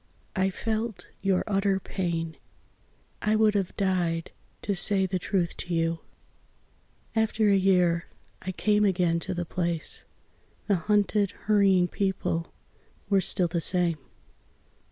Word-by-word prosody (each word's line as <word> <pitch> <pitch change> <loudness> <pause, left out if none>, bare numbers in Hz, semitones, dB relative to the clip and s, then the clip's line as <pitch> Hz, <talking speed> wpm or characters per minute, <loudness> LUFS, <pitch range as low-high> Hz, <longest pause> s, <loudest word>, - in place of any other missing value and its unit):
I 190 0 +2
felt 220 +2 -3 0.2
your 195 -2 +2
utter 195 -1 +1
pain. 170 -4 -3 0.9
I 215 +1 +2
would 215 -1 +4
have 195 -3 -2
died 175 -4 0 0.3
to 205 - 0
say 195 +1 +3
the 185 0 -2
truth 180 -1 -1
to 175 -1 -3
you. 165 0 0 1.2
After 220 -1 +2
a - - +5
year 180 -3 +3 0.3
I 185 - -4
came 210 +2 +2
again 175 -4 +2
to 180 - -4
the 175 0 -2
place 170 -2 -3 0.6
The 205 - +2
hunted 205 +2 +2 0.2
hurrying 195 -4 +4
people 185 -3 -2 0.6
were 195 -1 +5
still 180 -1 +2
the 170 0 -2
same.... 175 -3 +2
190 Hz, 130 wpm, -27 LUFS, 170-205 Hz, 1.2 s, a